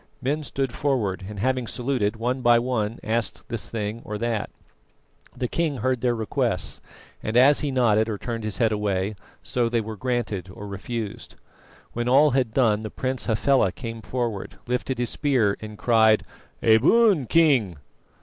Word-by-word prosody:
Men 145 +4 -1
stood 135 -3 -3
forward, 105 -10 -1
and 105 - -8
having 130 +1 0
saluted, 120 -4 -1
one 125 +3 -2
by 120 -1 +5
one 115 -2 -1
asked 115 +1 -2
this 115 -2 -4
thing 110 0 -4
or 105 - -5
that. 115 -1 -2 0.9
The 125 - -1
king 155 0 -1
heard 130 -1 0
their 120 -1 +1
requests, 110 -3 -1 0.4
and 110 +2 -1
as 140 +4 +6
he 150 - -1
nodded 115 -4 +2
or 105 - -2
turned 115 +1 -5
his 105 -3 -3
head 115 +1 +2
away, 105 -1 -1 0.3
so 120 -2 0
they 120 0 +1
were 110 0 -5
granted 110 -5 -2
or 100 - -9
refused. 110 +2 -6 0.6
When 120 +1 -1
all 145 +3 +6
had 125 -3 +1
done, 110 -4 +2
the 110 - -5
Prince 130 +2 -3
Hafela 115 -2 +3
came 115 0 -7
forward, 115 -3 -3
lifted 125 +1 -2
his 120 -1 -1
spear, 125 -9 +1
and 105 -1 -8
cried: 110 -1 +4 0.4
"A 110 -1 +6
boon, 185 - +4
King!" 130 - +3
115 Hz, 170 wpm, -24 LUFS, 110-130 Hz, 0.9 s, as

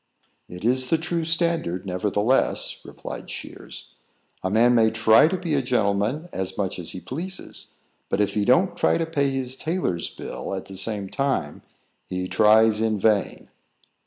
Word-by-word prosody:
"It 90 +4 -8
is 130 +1 +2
the 165 - +3
true 170 +1 -2
standard, 165 - 0
nevertheless," 105 +6 +1
replied - - -8
Shears. - - -9 0.5
"A 95 - 0
man 115 +4 +4
may 115 -2 +5
try 110 +4 +5
to 185 +3 -1
be 170 -3 -3
a 140 - +2
gentleman 120 - 0
as 95 -1 -3
much 95 -2 -2
as 85 - -3
he 90 - -6
pleases, 165 - -6 0.3
but 95 - 0
if 100 -1 +1
he 105 - +1
don't 175 - +3
try - - +2
to 165 - 0
pay 145 -4 0
his 130 -1 -2
tailor's 155 - -2
bill - - -6
at 95 - -6
the 95 - -10
same 100 0 -3
time, 135 - -2 0.5
he 90 0 -3
tries 110 +1 +4
in 110 -2 +1
vain." 105 -1 +1
110 Hz, 165 wpm, -24 LUFS, 100-145 Hz, 0.5 s, may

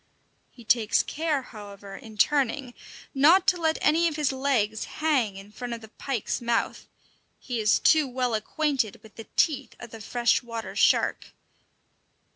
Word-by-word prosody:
He 240 - -16
takes 225 -1 +3
care, 305 -3 -2
however, 200 -3 -11
in 220 -3 -12
turning, 275 0 +1 0.4
not 325 +7 +5
to 355 -2 -1
let 320 -1 +1
any 330 +3 +3
of 320 - -3
his 300 -3 0
legs 255 -6 0
hang 270 -10 0
in 195 +1 -12
front 240 +3 -6
of 230 - -7
the 220 - -12
pike's 245 -1 -3
mouth; 235 -1 -1 0.5
he 245 -3 -4
is 215 -1 +3
too 310 -3 +4
well 250 -1 -2
acquainted 250 0 -1
with 220 - -16
the 225 - -10
teeth 305 -5 +1
of - - -10
the 225 - -10
fresh 240 +3 +1
water 230 -2 -7
shark! - - +2
245 Hz, 160 wpm, -26 LUFS, 220-295 Hz, 0.5 s, not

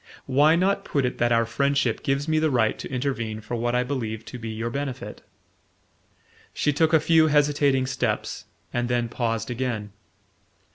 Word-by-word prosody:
Why 145 +4 +4
not 190 +3 +1
put 140 -3 0
it 125 - -3
that 120 0 +2
our 115 0 +3
friendship 140 0 0
gives 140 +2 -1
me 155 0 +2
the 155 0 +2
right 120 -5 +1
to - - -7
intervene 120 -5 -2
for 110 - -8
what 120 +1 0
I 125 - +2
believe 115 -5 -4
to 125 - -8
be 115 0 -6
your 115 +2 -3
benefit?" 135 -1 -5 1.3
She 150 - +1
took 160 +2 +2
a 160 - +6
few 160 0 +4
hesitating 145 -3 +3
steps - - -2 0.3
and 120 0 -1
then 120 -1 0
paused 115 -1 -2
again. 120 -4 -3
130 Hz, 175 wpm, -25 LUFS, 115-145 Hz, 1.3 s, a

